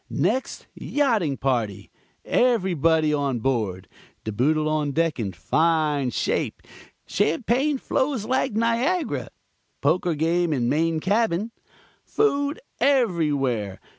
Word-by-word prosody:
Next, 260 Hz, -, -1 dB
yachting 220 Hz, -, 0 dB
party. 115 Hz, -7 st, -2 dB, 0.3 s
Everybody 165 Hz, -, +2 dB
on 140 Hz, -4 st, 0 dB
board. 110 Hz, -7 st, -2 dB, 0.4 s
De 110 Hz, -, -3 dB
Boodle 150 Hz, +8 st, +1 dB
on 150 Hz, -2 st, 0 dB
deck 165 Hz, -2 st, 0 dB
in 100 Hz, -4 st, -2 dB
fine 150 Hz, -, +1 dB
shape. -, -, -2 dB, 0.4 s
Champagne 250 Hz, -, +1 dB
flows 260 Hz, -3 st, -1 dB
like 260 Hz, 0 st, 0 dB
Niagara. 235 Hz, -, 0 dB, 0.5 s
Poker 175 Hz, -2 st, +1 dB
game 165 Hz, +2 st, +1 dB
in 120 Hz, -4 st, 0 dB
main 160 Hz, +3 st, +1 dB
cabin. 210 Hz, +1 st, 0 dB, 0.5 s
Food 290 Hz, -7 st, 0 dB, 0.2 s
everywhere. 150 Hz, -, +1 dB
165 Hz, 105 wpm, -24 LUFS, 140-230 Hz, 0.5 s, Everybody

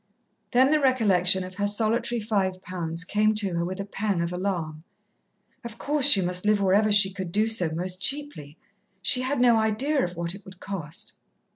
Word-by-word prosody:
Then 260 Hz, +3 st, +3 dB
the 310 Hz, -, +3 dB
recollection 195 Hz, -9 st, +2 dB
of 185 Hz, 0 st, -9 dB
her 205 Hz, 0 st, 0 dB
solitary 230 Hz, +3 st, 0 dB
five 200 Hz, -4 st, -2 dB
pounds 170 Hz, -2 st, -3 dB
came 210 Hz, +3 st, 0 dB
to 200 Hz, -4 st, -2 dB
her 170 Hz, 0 st, -1 dB
with 185 Hz, +3 st, -5 dB
a 200 Hz, -, -4 dB
pang 200 Hz, -2 st, -3 dB
of 170 Hz, +1 st, -4 dB
alarm. 170 Hz, -5 st, -4 dB, 0.8 s
Of 235 Hz, -1 st, -9 dB
course, 290 Hz, 0 st, +2 dB
she 200 Hz, -10 st, +9 dB
must 180 Hz, +1 st, -1 dB
live 210 Hz, 0 st, +2 dB
wherever 200 Hz, +2 st, +2 dB
she 200 Hz, -2 st, +5 dB
could 190 Hz, -3 st, -6 dB
do 215 Hz, +4 st, +1 dB
so 205 Hz, -7 st, 0 dB
most 180 Hz, +3 st, -4 dB
cheaply. 270 Hz, -, -4 dB, 0.5 s
She 255 Hz, -, +1 dB
had 260 Hz, +1 st, -2 dB
no 240 Hz, -2 st, +4 dB
idea 235 Hz, +7 st, 0 dB
of 180 Hz, 0 st, -4 dB
what 170 Hz, 0 st, -3 dB
it 195 Hz, +1 st, -12 dB
would 185 Hz, -1 st, -14 dB
cost. 190 Hz, 0 st, -6 dB
200 Hz, 190 wpm, -25 LUFS, 180-225 Hz, 0.8 s, she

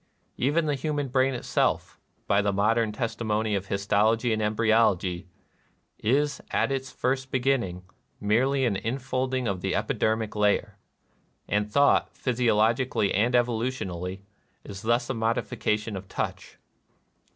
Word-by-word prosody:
Even 150 Hz, +6 st, +1 dB
the 150 Hz, -, +1 dB
human 145 Hz, -1 st, -2 dB
brain 130 Hz, +1 st, +2 dB
itself, 120 Hz, -, -1 dB, 0.3 s
by 100 Hz, +1 st, +3 dB
the 100 Hz, 0 st, +1 dB
modern 110 Hz, +3 st, +2 dB
testimony 110 Hz, -1 st, -1 dB
of 100 Hz, -1 st, -2 dB
his 100 Hz, +1 st, -3 dB
tology 110 Hz, +3 st, +2 dB
and 110 Hz, -, -1 dB
embryology, 105 Hz, -4 st, +2 dB, 0.7 s
"is, 145 Hz, +6 st, +1 dB
at -, -, +1 dB
its 135 Hz, -1 st, -3 dB
first 130 Hz, +1 st, -1 dB
be 130 Hz, -, 0 dB
ginning, 115 Hz, -9 st, 0 dB, 0.4 s
merely 130 Hz, +6 st, +2 dB
an 110 Hz, -5 st, +1 dB
infolding 130 Hz, +2 st, -2 dB
of 95 Hz, -3 st, -2 dB
the -, -, -1 dB
epidermic 110 Hz, -1 st, 0 dB
layer;" 105 Hz, -1 st, +1 dB, 0.7 s
and 105 Hz, +1 st, 0 dB
thought, 140 Hz, +3 st, +3 dB
physiologically 115 Hz, -2 st, +1 dB
and 115 Hz, +5 st, +2 dB
evo 120 Hz, -2 st, +2 dB
lutionally, 95 Hz, -7 st, -4 dB, 0.4 s
is 100 Hz, -1 st, -8 dB
thus 120 Hz, +2 st, +1 dB
a -, -, -2 dB
modification 110 Hz, -2 st, -1 dB
of 95 Hz, 0 st, -7 dB
touch. -, -, -5 dB
115 Hz, 135 wpm, -26 LUFS, 105-130 Hz, 0.7 s, by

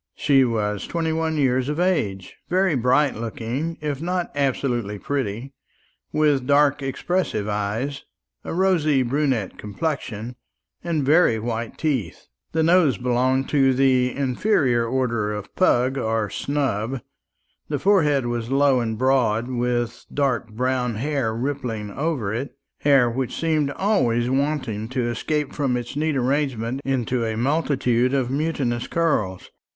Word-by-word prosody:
She 135 Hz, -3 st, +4 dB
was 105 Hz, -4 st, -1 dB
twenty 165 Hz, -1 st, -1 dB
one 160 Hz, -1 st, -1 dB
years 130 Hz, -1 st, +1 dB
of 150 Hz, +2 st, -2 dB
age, 105 Hz, -, -1 dB
very 185 Hz, 0 st, +2 dB
bright 130 Hz, +3 st, +3 dB
looking, 115 Hz, +8 st, -4 dB
if 145 Hz, -2 st, -3 dB
not 180 Hz, +1 st, -2 dB
absolutely 125 Hz, -6 st, -1 dB
pretty, 130 Hz, +1 st, -3 dB, 0.6 s
with 145 Hz, -4 st, +2 dB
dark 145 Hz, 0 st, +4 dB
expressive 135 Hz, -, -1 dB
eyes, 105 Hz, +7 st, -2 dB, 0.4 s
a -, -, -5 dB
rosy 165 Hz, -7 st, +2 dB
brunette 130 Hz, -5 st, -1 dB
complexion, 120 Hz, -1 st, -4 dB, 0.5 s
and 160 Hz, -5 st, -1 dB
very 150 Hz, -5 st, +4 dB
white 115 Hz, +1 st, -4 dB
teeth. 130 Hz, -, -2 dB, 0.3 s
The 160 Hz, 0 st, +1 dB
nose 165 Hz, -, +4 dB
belonged 125 Hz, +3 st, +1 dB
to 135 Hz, -3 st, +3 dB
the 130 Hz, -1 st, +3 dB
inferior 130 Hz, -, +1 dB
order 115 Hz, -4 st, 0 dB
of 105 Hz, -1 st, -7 dB
pug 130 Hz, -6 st, +2 dB
or 110 Hz, -3 st, -1 dB
snub; 130 Hz, -3 st, -2 dB, 0.7 s
the 150 Hz, -, 0 dB
forehead 150 Hz, -6 st, +3 dB
was 120 Hz, -1 st, -3 dB
low 135 Hz, -1 st, +3 dB
and 110 Hz, -2 st, -2 dB
broad, 125 Hz, -3 st, +2 dB
with 120 Hz, -1 st, -2 dB
dark 135 Hz, -5 st, 0 dB
brown 125 Hz, +1 st, -1 dB
hair 135 Hz, -1 st, -1 dB
rippling 120 Hz, -5 st, -3 dB
over 135 Hz, -7 st, -2 dB
it 135 Hz, +5 st, -5 dB, 0.2 s
hair 140 Hz, -4 st, +4 dB
which 125 Hz, +1 st, -3 dB
seemed 155 Hz, -3 st, +1 dB
always 125 Hz, -, +1 dB
wanting 130 Hz, -6 st, -1 dB
to 125 Hz, -2 st, -1 dB
escape 150 Hz, +5 st, -2 dB
from 135 Hz, -4 st, 0 dB
its 120 Hz, +1 st, -6 dB
neat 155 Hz, 0 st, 0 dB
arrangement 130 Hz, -2 st, -1 dB
into 125 Hz, -2 st, -1 dB
a 110 Hz, -1 st, -2 dB
multitude 130 Hz, -2 st, +1 dB
of 130 Hz, -2 st, 0 dB
mutinous 135 Hz, -5 st, -1 dB
curls. 125 Hz, -, -1 dB
130 Hz, 135 wpm, -23 LUFS, 115-145 Hz, 0.7 s, She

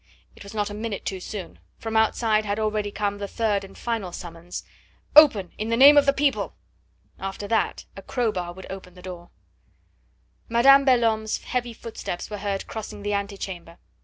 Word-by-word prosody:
It -, -, -17 dB
was 200 Hz, +2 st, -10 dB
not 205 Hz, -1 st, -1 dB
a -, -, -6 dB
minute 215 Hz, -1 st, -4 dB
too 190 Hz, -, -3 dB
soon. 190 Hz, 0 st, -7 dB, 0.2 s
From 225 Hz, 0 st, -5 dB
outside 220 Hz, 0 st, +3 dB
had 205 Hz, -1 st, -2 dB
already 215 Hz, -1 st, 0 dB
come 205 Hz, 0 st, -2 dB
the 200 Hz, -, -3 dB
third 210 Hz, -2 st, 0 dB
and 195 Hz, -, -12 dB
final 225 Hz, -6 st, -3 dB
summons: 170 Hz, 0 st, -7 dB, 0.5 s
"Open, 245 Hz, -, +7 dB
in 215 Hz, +1 st, -2 dB
the 230 Hz, -, +1 dB
name 280 Hz, +3 st, +9 dB
of 285 Hz, -1 st, +5 dB
the -, -, +7 dB
people!" 280 Hz, 0 st, 0 dB, 0.6 s
After 195 Hz, +1 st, -5 dB
that 225 Hz, -, 0 dB
a 195 Hz, -, -8 dB
crowbar 195 Hz, -8 st, -2 dB
would 190 Hz, +1 st, -10 dB
break 190 Hz, -, -5 dB
open 180 Hz, -2 st, -14 dB
the 180 Hz, -, -14 dB
door. 175 Hz, -2 st, -8 dB, 1.2 s
Madame 275 Hz, +4 st, +6 dB
Belhomme's 225 Hz, -4 st, +2 dB
heavy 245 Hz, -1 st, -2 dB
footsteps 220 Hz, -5 st, -6 dB
were 210 Hz, -, -4 dB
heard 200 Hz, -1 st, -2 dB
crossing 215 Hz, -2 st, -7 dB
the 205 Hz, 0 st, -1 dB
ante 200 Hz, 0 st, -2 dB
chamber. 175 Hz, -3 st, -7 dB
210 Hz, 185 wpm, -25 LUFS, 195-230 Hz, 1.2 s, name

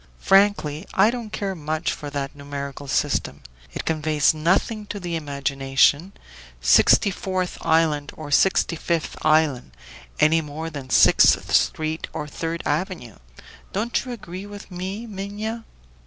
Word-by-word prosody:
"Frankly, 195 Hz, -6 st, +2 dB
I 200 Hz, +4 st, +5 dB
don't 235 Hz, -3 st, -6 dB
care 200 Hz, -2 st, -3 dB
much 155 Hz, -1 st, -2 dB
for 145 Hz, -, -6 dB
that 140 Hz, 0 st, -4 dB
numerical 140 Hz, 0 st, -7 dB
system; 135 Hz, -, -1 dB, 0.3 s
it -, -, -6 dB
conveys 155 Hz, -2 st, +2 dB
nothing 190 Hz, +7 st, 0 dB
to 205 Hz, -, -5 dB
the 175 Hz, -2 st, -4 dB
imagination 140 Hz, +3 st, +1 dB, 0.5 s
Sixty 65 Hz, -, +5 dB
fourth 185 Hz, -1 st, -3 dB
Island 155 Hz, -3 st, +2 dB
or 150 Hz, -2 st, -8 dB
Sixty 180 Hz, +2 st, +3 dB
fifth 165 Hz, -1 st, -2 dB
Island, 155 Hz, -, +2 dB, 0.5 s
any 160 Hz, +1 st, +4 dB
more 160 Hz, +2 st, -6 dB
than 140 Hz, -3 st, -8 dB
Sixth -, -, +5 dB
Street 155 Hz, +1 st, +1 dB
or 150 Hz, -, -4 dB
Third 165 Hz, +3 st, -4 dB
Avenue. 150 Hz, -, -3 dB, 0.6 s
Don't 220 Hz, +5 st, -1 dB
you 250 Hz, -, -7 dB
agree 200 Hz, -4 st, -8 dB
with 205 Hz, -1 st, -11 dB
me, 190 Hz, +5 st, -5 dB
Minha?" 215 Hz, +2 st, -5 dB
160 Hz, 135 wpm, -23 LUFS, 145-195 Hz, 0.6 s, I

